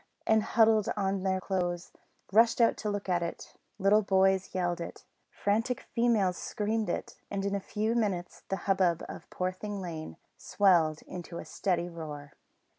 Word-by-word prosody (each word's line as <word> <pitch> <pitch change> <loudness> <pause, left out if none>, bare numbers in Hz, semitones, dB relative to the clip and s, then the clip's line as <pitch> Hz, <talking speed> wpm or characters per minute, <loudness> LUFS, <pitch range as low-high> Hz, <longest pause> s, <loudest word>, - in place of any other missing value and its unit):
and, 220 0 +4
huddling 220 -1 +4
on 195 -1 0
their 190 0 +1
clothes, 175 -2 -2 0.4
rushed 225 +4 +5
out 230 - +5
to 215 - -3
look 205 -1 -3
at 180 -2 +1
it; 170 - -5 0.2
little 205 +2 +4
boys 190 -1 +2
yelled 175 -1 0
it; - - -8 0.2
frantic 225 +5 0
females 220 -7 +2
screamed 215 -1 -2
it, - - -4
and 200 -1 -2
in 200 - -1
a 200 - 0
few 215 +3 -1
minutes 195 -7 -1
the 195 - +1
hubbub 185 -4 +2
in - - -7
Poorthing 185 +3 -3
Lane 160 - -6 0.2
swelled 170 -6 +3
into 175 -1 -7
a - - -6
steady 175 -3 -1
roar. 150 -4 -8
190 Hz, 160 wpm, -30 LUFS, 175-210 Hz, 0.4 s, rushed